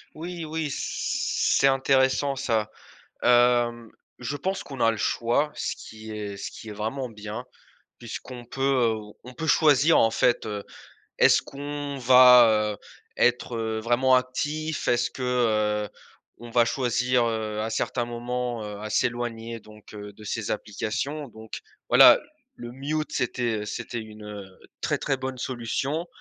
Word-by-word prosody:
Oui, 170 +1 -6
oui, 155 -1 -3
c'est 135 - +1
intéressant, 135 +1 +2
ça, 115 -5 -1 0.5
hem, 120 -1 +3 0.3
je 125 +4 -4
pense 190 +7 -2
qu'on 135 -3 -9
a 115 - +5
le 115 - -3
choix, 120 +8 0
ce - - -3
qui 110 0 -11
est 105 -2 -5
ce - - -6
qui 110 - -11
est - - -6
vraiment 115 +6 -3
bien 105 -1 -7 0.5
puisqu'on 120 +1 -8
peut, 135 +3 -6
heu, 125 -5 +2 0.3
on 125 +1 -11
peut 160 - -4
choisir, 150 +1 +5
en 115 - +4
fait, 120 0 +2
heu, 105 -2 -4 0.6
est-ce - - +5
qu'on 145 0 -6
va, 125 -4 +7
heu, - - -28 0.4
être, 125 0 +1
heu, 110 -1 -2
vraiment 125 +3 +3
actif? 145 +5 -2
Est-ce 120 0 +2
que, 130 - -7
heu, 110 -4 +1 0.5
on 120 0 -10
va 120 0 +4
choisir, 125 0 +1
heu, 110 -2 -2
à 110 - -3
certains 120 +2 -1
moments, 120 -1 -3
heu, 105 -1 -7
à 110 0 -6
s'éloigner, 115 0 -2
donc 105 0 -16
heu, 105 0 -8
de 105 +2 -14
ces 105 +1 -3
applications? 135 +8 -4
Donc, 110 -1 -9 0.3
voilà, - - +8 0.4
le 120 0 -8
mute 150 +4 -3
c'était 120 -3 -1
c'était 120 +2 -5
une, 110 -1 -11
heu, 105 -1 -7 0.4
très, - - 0
très 135 - -1
bonne 130 0 -5
solution, 130 +7 -2
120 Hz, 155 wpm, -25 LUFS, 110-135 Hz, 0.6 s, voilà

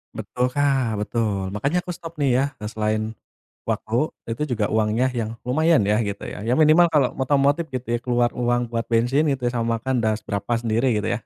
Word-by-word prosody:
Betul, 125 0 -2
Kak, 135 -5 +1
betul. 105 -5 -2
Makanya 140 - -1
aku 180 - -5
stop 165 -1 -9
nih 145 -3 +1
ya, - - +3 0.2
eee, 105 - -4
selain 110 0 -1 0.7
waktu, 110 - -2 0.4
itu 115 +6 -2
juga 105 -2 -1
uangnya 110 +4 +1
yang 115 -2 -3
lumayan 155 +1 +3
ya, 105 +2 +2
gitu 100 -3 -3
ya. - - -6
Ya 120 - +3
minimal 155 +3 +6
kalo 140 -5 +3
otomotif 145 +4 +2
gitu 125 0 -5
ya, 120 - +1
keluar 120 -1 +1
uang 120 -1 -1
buat 115 0 -2
bensin 125 +7 +2
itu 135 -3 -1
ya, - - 0
sama 115 0 0
makan, 130 +1 -1
dah 110 0 +2
seberapa 100 +3 -3
sendiri 115 +2 0
gitu 105 - -3
ya. 120 - -1
120 Hz, 205 wpm, -23 LUFS, 110-140 Hz, 0.7 s, minimal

